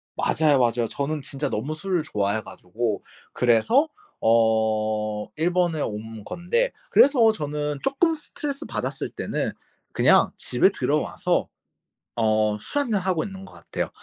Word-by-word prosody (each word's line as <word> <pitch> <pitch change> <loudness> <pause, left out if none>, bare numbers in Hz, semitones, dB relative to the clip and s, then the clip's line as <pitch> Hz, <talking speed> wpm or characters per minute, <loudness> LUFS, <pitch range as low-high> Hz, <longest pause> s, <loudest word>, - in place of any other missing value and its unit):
맞아요, 150 -3 +3
맞아요. 120 -1 +2
저는 145 +1 -2
진짜 140 +1 -4
너무 130 +9 -2
술을 175 +1 -1
좋아해 105 -5 -1
가지고 100 +3 -4 0.3
그래서 125 - +3 0.3
어 110 -2 +2
일본에 170 -1 +1
온 110 +1 -5
건데 180 - -1 0.2
그래서 245 -6 +6
저는 150 -5 -3
쪼금 320 +5 +2
스트레스 295 -2 -5
받았을 - - -3
때는 - - -3 0.4
그냥 - - +5
집에 - - +2
들어와서 - - 0 0.7
어 110 -2 +2
술 290 - -2
한 245 - -5
잔 205 - +2
하고 180 -3 0
있는 195 -1 -8
것 - - -14
같아요. - - -4
145 Hz, 280 characters per minute, -24 LUFS, -, 0.7 s, 그래서